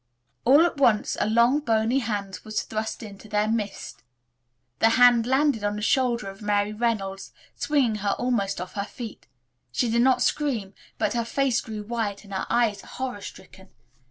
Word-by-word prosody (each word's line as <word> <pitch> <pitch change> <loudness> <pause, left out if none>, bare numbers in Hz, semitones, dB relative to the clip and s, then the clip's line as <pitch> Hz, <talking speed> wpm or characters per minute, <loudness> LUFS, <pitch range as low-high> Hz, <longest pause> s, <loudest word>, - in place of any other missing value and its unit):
All 285 +7 +7
at 345 - -2
once 235 -6 +3
a - - +1
long 235 +5 +4
bony 230 -1 +1
hand 205 -5 -3
was 215 0 -2
thrust 220 +2 -4
into 210 0 -11
their 210 0 +1
midst. 215 -2 -3 0.8
The 225 - +5
hand 245 -2 +6
landed 265 -3 +2
on 205 0 0
the 210 - -5
shoulder 240 -2 +1
of 195 +3 -16
Mary 205 0 0
Reynolds, 210 -4 -2 0.2
swinging 270 -7 +1
her 200 -1 0
almost 215 -7 -1
off 180 +1 -6
her 200 - -2
feet. 230 0 -9 0.4
She 225 - 0
did 235 +1 +3
not 250 -1 +4
scream, 240 -12 -1 0.2
but - - 0
her 235 -1 0
face 265 +1 0
grew 215 -3 -6
white 215 -2 -3
and 200 -1 -11
her 190 - -3
eyes 220 -4 +1
horror 255 -6 -6
stricken. 190 0 -12
225 Hz, 175 wpm, -25 LUFS, 205-245 Hz, 0.8 s, All